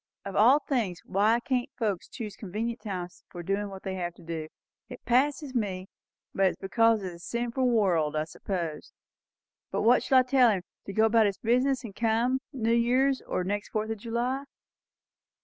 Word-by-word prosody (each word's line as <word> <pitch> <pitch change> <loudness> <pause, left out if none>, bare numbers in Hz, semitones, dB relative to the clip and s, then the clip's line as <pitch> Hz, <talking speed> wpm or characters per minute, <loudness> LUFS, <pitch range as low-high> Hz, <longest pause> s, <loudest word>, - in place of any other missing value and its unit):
Of 195 -1 -5
all 245 +7 +6
things, 235 - -1
why 210 +5 +3
can't 250 0 -1
folks 210 -7 -1
choose 210 -4 -7
convenient 225 +4 -4
times 180 -4 -6
for 175 -1 -8
doin' 200 +3 -1
what 190 -1 -9
they 190 - -3
have 175 -1 -3
to - - -16
do! 160 -2 -5 0.4
It - - -11
passes 275 +3 +1
me. 195 -6 -2 0.4
It's 190 -1 +2
because 225 +2 +2
it's 185 -2 -4
a 170 - -12
sinful 240 +2 0
world, 175 -10 +2
I 155 - +1
suppose. 165 -1 -5 0.8
But - - -1
what 245 +2 +5
shall 265 - +3
I 255 - +7
tell 255 -1 +5
him? 195 -5 0 0.2
to 200 - -5
go 220 +2 +4
about 225 -1 +4
his 200 - -2
business, 255 +3 +1
and 205 -5 -8
come 230 +3 +1
New 230 -5 0
Year's, 255 +3 +2
or 180 - -1
next 205 +2 -3
Fourth 220 0 -2
of 220 - -3
July?" 245 +5 -2
220 Hz, 185 wpm, -28 LUFS, 190-245 Hz, 0.8 s, I